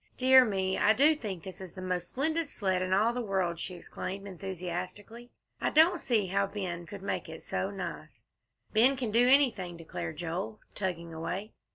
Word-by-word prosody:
"Dear 260 0 +7
me, 190 -4 0
I 215 - +5
do 290 +6 +5
think 200 - -5
this 190 0 -8
is 185 -3 -9
the 185 - -7
most 180 -1 -2
splendid 315 - -1
sled 190 -6 0
in 185 0 -2
all 215 +5 +3
the 245 - -2
world," 190 -6 -1
she 180 - -4
exclaimed 195 +3 -6
enthusiastically. 190 +5 -6 0.3
"I - - +2
don't 335 +3 +5
see 230 -7 +1
how 195 +2 +1
Ben 180 -4 -5
could 200 +1 -9
make 200 - -3
it - - -9
so - - -2
nice." - - -7 0.5
"Ben 250 +5 +5
can 245 -4 -2
do 240 +3 +5
anything," 225 -11 +3
declared 90 - -6
Joel, 175 +5 -4
tugging 170 -4 -3
away. 190 +6 -4
195 Hz, 185 wpm, -30 LUFS, 180-240 Hz, 0.5 s, Dear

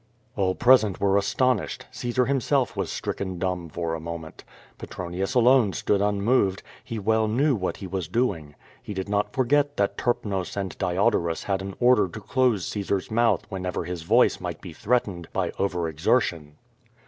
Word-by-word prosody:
All 95 -2 +1
present 120 -6 +4
were 100 -1 +2
astonished. 105 +3 0
Caesar 125 +1 0
himself 135 -3 +1
was - - -2
stricken 95 -2 -4
dumb 90 -2 -2
for 85 +1 -3
a 80 - -3
moment. 80 -1 -8 0.4
Petronius 90 +6 -4
alone 125 -4 +5
stood 100 +5 0
unmoved; 100 0 +1 0.2
he 115 - -5
well 110 +1 +1
knew 135 +6 +2
what 95 -4 -3
he 100 - -8
was 95 -2 -3
doing. 85 -10 -1 0.3
He 105 - -7
did 95 0 -3
not 105 0 0
forget 145 +2 +1
that 100 - 0
Terp 120 -2 0
nos 95 -4 -3
and 95 -2 -3
Diodorus 90 -3 +1
had 95 -1 -1
an 95 0 -6
order 120 -5 +4
to 110 - -8
close 110 - +1
Caesar's 100 0 -2
mouth 115 -4 +2
when 95 -1 -5
ever 90 0 -2
his 90 -2 -5
voice 110 +10 +3
might - - -5
be 85 - -9
threatened 105 -5 -1
by - - -1
over 90 -4 0
exertion. 80 -2 0
100 Hz, 170 wpm, -25 LUFS, 90-120 Hz, 0.4 s, alone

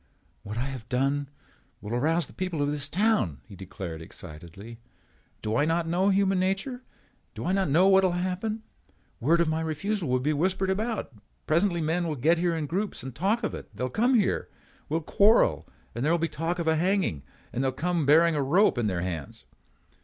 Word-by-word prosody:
"What 105 +2 -7
I 120 - -1
have 130 -5 -7
done 135 +2 0 0.5
will 105 +3 -6
arouse 160 +7 +1
the - - -15
people 185 -4 -3
of 145 - 0
this 145 -1 0
town," 190 - +1
he 100 - -12
declared 90 -3 -7
excitedly. 85 +8 -10 0.6
"Do 110 +1 -1
I 145 - +3
not 165 +2 0
know 180 +4 +2
human 195 -1 +2
nature? 195 +7 -1 0.5
Do - - -5
I 180 - +1
not 190 -3 +1
know 170 +7 +5
what 190 0 +5
will 185 -2 +2
happen? 185 +5 -2 0.6
Word 165 +7 +3
of 170 - +2
my 160 +1 0
refusal 165 +3 -2
will 130 0 +2
be 150 +4 0
whispered 190 +5 0
about. 215 - -2 0.3
Presently 170 +2 +2
men 165 +2 0
will 155 - -2
get 155 +6 +3
together 170 0 +1
in 155 - -2
groups 190 - -3
and 130 -1 -6
talk 200 - 0
of - - -1
it. - - -8
They - - -4
will 130 - -2
come 245 - +2
here. 210 -5 +1 0.4
We 155 - -1
will 165 - 0
quarrel 205 +8 +3 0.3
and 120 - -3
there 155 - +2
will 170 - +3
be 165 0 0
talk 165 +3 -3
of 170 - -2
hanging. 160 - +1 0.3
Then 125 - -2
they 135 - +1
will - - +1
come 175 +7 -1
again 160 - +1
bearing 165 +2 +5
a 145 - +1
rope 155 +1 +3
in 115 - +1
their 90 -3 -1
hands." 85 -6 -5
165 Hz, 215 wpm, -27 LUFS, 130-190 Hz, 0.6 s, know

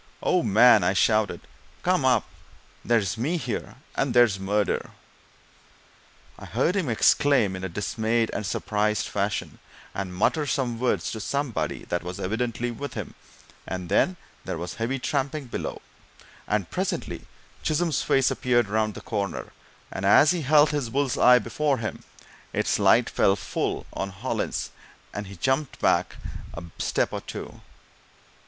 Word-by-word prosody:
"Oh, 180 - +3
man!" 110 -1 +6
I 90 - +2
shouted, 110 +2 +2 0.4
"come 180 -6 +2
up! 125 -4 +3 0.6
There's 110 -3 +1
me 155 +9 0
here 125 -8 -4 0.2
and - - -1
there's 120 -5 +5
murder!" 100 +1 0 1.5
I - - -9
heard 180 - 0
him 185 -9 0
exclaim 120 -3 +3
in 95 - -7
a 95 - -2
dismayed 110 +5 0
and - - -2
surprised 105 +1 0
fashion, 100 0 -2 0.3
and 95 -2 -4
mutter 145 - +1
some 120 -3 -1
words 125 0 0
to 110 - -5
somebody 140 +3 -2
that 85 - 0
was 90 0 -6
evidently 115 +4 -2
with 140 +5 -6
him, - - -5 0.5
and 90 -1 -5
then 175 - +2 0.3
there - - -4
was 85 -2 -5
heavy 115 - -2
tramping 140 +2 -2
below, 120 - -5 0.6
and - - -1
presently - - -3 0.3
Chisholm's 160 +1 +1
face 135 -1 +3
appeared 120 -4 +1
round 110 0 0
the - - -8
corner; 100 -3 -3 0.4
and 95 - -5
as 145 - +6
he 175 -2 -1
held 150 +1 +5
his 145 -5 -2
bull's 135 +1 0
eye 125 0 +7
before 140 +4 0
him, 110 -2 -5 0.5
its - - +1
light - - +5
fell 95 - +3
full 95 - -3
on 95 - -3
Hollins, 95 +7 -3 0.4
and 105 -1 -5
he 100 - -9
jumped 130 - -1
back - - +2 0.4
a 85 - -6 0.2
step - - 0
or - - -3
two. - - -8
115 Hz, 150 wpm, -26 LUFS, 100-135 Hz, 1.5 s, eye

